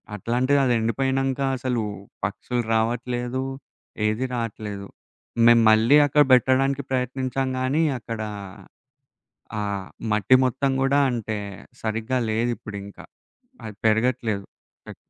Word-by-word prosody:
అట్లాంటిదది 125 +5 +1
ఎండిపోయినంక 135 +3 0 0.2
అసలు, 125 -3 -1 0.4
పక్షులు 105 +5 -3
రావట్లేదు. 120 +3 -1 0.6
ఏది 110 +4 -1
రాట్లేదు. 105 -4 -5 0.6
మేము 120 -1 +7
మళ్ళీ 115 +6 +5
అక్కడ 145 +1 +4
బెట్టడానికి 130 +2 +3
ప్రయత్నించాంగానీ 130 +2 -1 0.2
అక్కడ 115 -1 -6 1.4
ఆ - - -1 0.5
మట్టి 105 +4 +4
మొత్తం 135 +2 0
కూడా 135 +1 +3
అంటే, 110 -3 -3 0.4
సరిగ్గా 115 +3 -1
లేదిప్పుడింకా. 110 -3 -4 0.6
అది 110 - -7
పెరగట్లేదు. 110 -2 +1 0.5
అక్ - - -9
120 Hz, 90 wpm, -24 LUFS, 110-130 Hz, 1.4 s, మేము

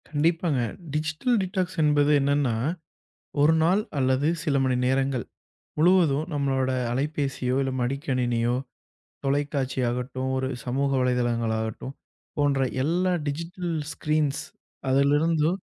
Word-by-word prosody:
கண்டிப்பாங்க. 160 0 +1 0.3
Digital 155 +11 0
detox 185 -1 -2
என்பது 150 -1 +3
என்னன்னா, 140 -3 +1 0.9
ஒரு 150 +2 +5
நாள் 185 +5 +3 0.2
அல்லது 130 +2 +2 0.2
சில 150 -4 0
மணி 130 -1 +1
நேரங்கள் 130 -1 +1 0.5
முழுவதும், 160 -4 +4
நம்மளோட 135 -2 0 0.2
அலைபேசியோ, 135 -1 -1
இல்ல 135 - -1
மடிக்கணினியோ, 125 -3 0 0.7
தொலைக்காட்சி 135 -2 0
ஆகட்டும், 130 +2 -3
ஒரு 130 0 -1 0.2
சமூக 135 +3 0
வலைத்தளங்கள் 120 -3 +1
ஆகட்டும், 110 +4 -5 0.4
போன்ற 145 -2 +2 0.2
எல்லா 180 +4 +1 0.2
டிஜிட்டல் 170 +3 -3 0.2
ஸ்கிரீன்ஸ் 150 -2 0 0.5
அதிலிருந்து 150 +4 +3
140 Hz, 105 wpm, -26 LUFS, 130-155 Hz, 0.9 s, ஒரு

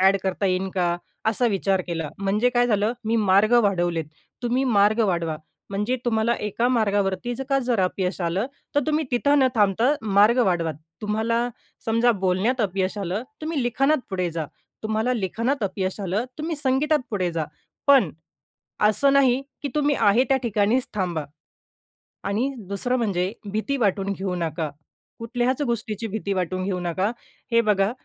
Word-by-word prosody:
Add 190 +1 +5
करता 190 +1 -1
येईन 185 +1 0
का? 175 -2 +1 0.3
असा 230 +3 +2
विचार 195 -1 +1
केला. 165 -3 -3
म्हणजे 205 +5 +2
काय 245 0 +4
झालं? 210 -1 +1
मी 225 +1 +1
मार्ग 200 +4 +5
वाढवलेत. 175 -5 +1 0.4
तुम्ही 245 +2 +1
मार्ग 215 -2 +3
वाढवा. 170 -4 -1 0.3
म्हणजे 210 +6 0
तुम्हाला 230 0 +2
एका 210 +3 0
मार्गावरती 205 -2 +1
जर 270 - -5
का 275 - +3
जर 245 -5 0
अपयश 185 0 -1
आलं 180 +6 0 0.3
तर 290 - +4
तुम्ही 310 0 +1
तिथं 285 +4 +3
न 265 - +5
थांबता 220 +4 +3
मार्ग 210 +3 +4
वाढवा. 170 -3 +1 0.3
तुम्हाला 225 +3 0 0.4
समजा 230 +2 +3
बोलण्यात 200 +8 +1
अपयश 190 -1 -1
आलं, 195 +3 -2 0.2
तुम्ही 310 -4 -1
लिखाणात 270 +5 +2
पुढे 185 -2 -1
जा, 165 -1 -3 0.4
तुम्हाला 220 +3 0
लिखाणात 230 +5 -1
अपयश 190 0 -2
आलं, 200 +4 -1
तुम्ही 320 +1 -3
संगीतात 290 +2 +2
पुढे 185 -5 0
जा. 165 -1 -1 0.4
पण 270 - +6 0.8
असं 275 +6 +3
नाही, 265 -2 +4 0.2
की 285 - -2
तुम्ही 290 -1 +2
आहे 220 +6 +5
त्या 270 - +4
ठिकाणीच 225 +2 +1
थांबा 175 -6 -1 1.1
आणि 220 +6 +1 0.2
दुसरं 245 +6 0
म्हणजे 190 -6 0 0.2
भीती 220 +7 -1
वाटून 200 -4 +1
घेऊ 190 -1 -3
नका. 165 -2 -2 0.5
कुठल्याच 245 +4 -1
गोष्टीची 230 -3 -2
भीती 200 -1 -3
वाटून 185 0 -2
घेऊ 190 -2 -1
नका. 180 +4 -1 0.4
हे 230 0 +5
बघा, 205 -2 +2
210 Hz, 155 wpm, -24 LUFS, 190-245 Hz, 1.1 s, पण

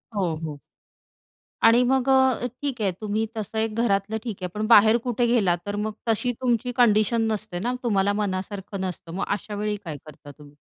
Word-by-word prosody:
हो, 175 -5 0
हो. 150 -2 -5 1.1
आणि 240 +2 +5
मग 265 +1 +1
अ, 265 -2 +3 0.2
ठीक 265 -5 -3
आहे 195 -2 +2
तुम्ही 215 +1 -1
तसं 220 +1 -5
एक 220 -1 -1
घरातलं 200 0 0
ठीक 225 -5 -4
आहे, - - 0
पण 215 +1 -2
बाहेर 220 0 +7
कुठे 240 0 +1
गेलात, 200 -8 +2
तर 205 0 -3
मग 215 - -2 0.2
तशी 245 +3 +1
तुमची 245 0 0
कंडिशन 225 -1 +4
नसते 210 -4 -4
ना, 245 +5 -1
तुम्हाला 200 -3 +2
मनासारखं 195 0 -4
नसतं. 180 -3 -5
मग 195 - -2
अशावेळी 210 0 -2
काय 155 -3 -5
करता 145 -1 -12
तुम्ही? 145 0 -16
210 Hz, 180 wpm, -24 LUFS, 195-235 Hz, 1.1 s, बाहेर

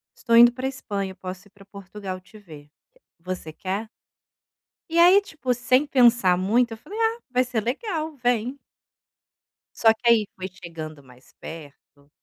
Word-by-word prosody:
"Estou 230 -2 0
indo 240 0 +9
para 255 +2 -6
a - - 0
Espanha, 200 -7 -5
posso 185 +2 -8
ir - - -25
para 200 -1 -18
Portugal 195 -1 -8
te 200 +4 -17
ver, 150 -6 -14 0.5
você 180 -2 -6
quer?". 195 +6 -4 1.0
E 335 +1 -1
aí 360 +4 +7
tipo 285 -10 -3
sem 255 +4 +2
pensar 235 -9 +4
muito 230 +5 +2
eu - - -5
falei: 415 - -9
"Ah, 455 +1 +1
vai 255 0 +2
ser 245 -3 -2
legal, 315 - -3
vem". 245 +2 -1 1.2
Só 225 -1 +5
que 220 - -26
aí 220 -3 +5
foi 185 0 -5
chegando 165 -5 -9
mais 125 0 -20
perto, 145 -2 -12
220 Hz, 160 wpm, -24 LUFS, 185-255 Hz, 1.2 s, indo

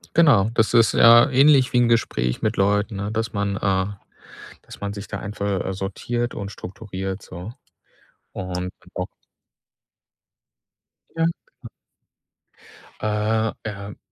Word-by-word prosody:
Genau, 145 -11 +5
das 110 0 +2
ist 115 -1 +5
ja 120 +4 +7
ähnlich 135 -1 +5
wie - - +3
'n 120 -1 +4
Gespräch 65 - 0
mit 110 0 -1
Leuten, 105 +2 +1
ne, 100 +2 -3
dass 110 0 -2
man, 100 -1 -1
äh, 95 -1 +1 0.8
dass - - -13
man 100 0 -3
sich 100 0 -8
da 100 - -5
einfach, 100 -1 -3
äh, 95 - -2
sortiert 120 +5 -3
und 100 -1 -6
strukturiert 95 0 -6
so. 90 +6 -9 0.8
Und 90 0 -4
genau. - - -6 2.1
Ja, 165 - 0
genau. 165 - -6 1.3
Äh, 110 +1 0
ähm, 100 -2 -7
105 Hz, 130 wpm, -23 LUFS, 95-115 Hz, 2.1 s, ja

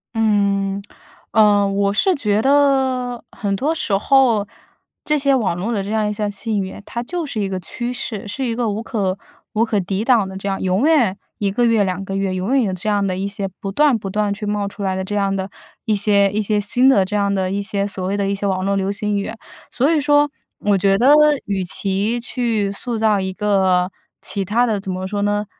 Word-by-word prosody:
嗯， 200 -2 +1 0.5
呃， 205 -2 +4
我 200 0 0
是 370 - +2
觉 210 -7 +1
得 265 -3 +2
很 200 -2 -2
多 290 +10 0
时 205 -10 0
候， 230 -3 +3 0.6
这 300 0 +1
些 275 -1 +3
网 205 -8 0
络 210 +6 -2
的 200 -4 -1
这 200 - -5
样 215 -1 +1
一 - - -2
项 210 0 -2
信 205 +1 -2
源， 190 +2 -7
它 235 - -4
就 345 +5 -4
是 260 -7 -4
一 200 - 0
个 190 -1 -3
趋 240 +8 -4
势， 220 -5 -4
是 265 +6 -4
一 230 -1 -1
个 235 -3 0
无 210 +2 -3
可 200 -5 -2 0.4
无 220 +1 +2
可 220 -3 0
抵 195 +2 -2
挡 230 -5 +3
的 190 - -8
这 195 +1 -4
样 195 - -2
永 190 +8 +1
远 240 -12 +3 0.2
1 200 -2 -1
个 240 +5 0
月、 225 -3 +3
2 185 0 -2
个 195 0 -5
月 195 -1 -1
永 190 +9 -1
远 265 - +4
有 190 -4 -1
这 185 +4 -3
样 205 -1 +1
的 185 - -1
一 195 - -2
些 200 -1 -3
不 195 - -4
断 285 +1 +3
不 195 - -5
断 210 0 0
去 210 +1 -6
冒 205 -1 -1
出 200 +1 -9
来 190 -1 -1
的 190 - -2
这 205 +2 -4
样 195 -1 +1
的 190 0 -3 0.4
一 215 - +1
些 200 -1 +3
一 215 - 0
些 210 0 0
新 245 +6 +3
的 200 -8 +4
这 210 - -4
样 200 -1 +1
的 185 -1 -1
一 200 +1 -1
些 200 0 -2
所 190 -2 -3
谓 200 +1 -1
的 200 - 0
一 200 - 0
些 200 0 -2
网 185 -1 -1
络 200 0 +1
流 195 0 0
行 210 0 -2
语。 - - -4 0.4
所 275 +6 +1
以 320 - +3
说， 290 0 +3 0.3
我 205 -1 +1
觉 195 +1 +3
得 250 - +3 0.4
与 195 -2 -1
其 200 +5 -1
去 230 -4 -1
塑 230 +3 -4
造 215 -2 +2
一 190 0 -2
个 190 -3 +1 0.3
其 200 - -2
它 225 +6 +2
的 220 -4 0
怎 195 -1 -5
么 185 +1 -4
说 205 0 -3
呢， 205 +1 0
205 Hz, 250 characters per minute, -19 LUFS, 195-230 Hz, 0.6 s, 呃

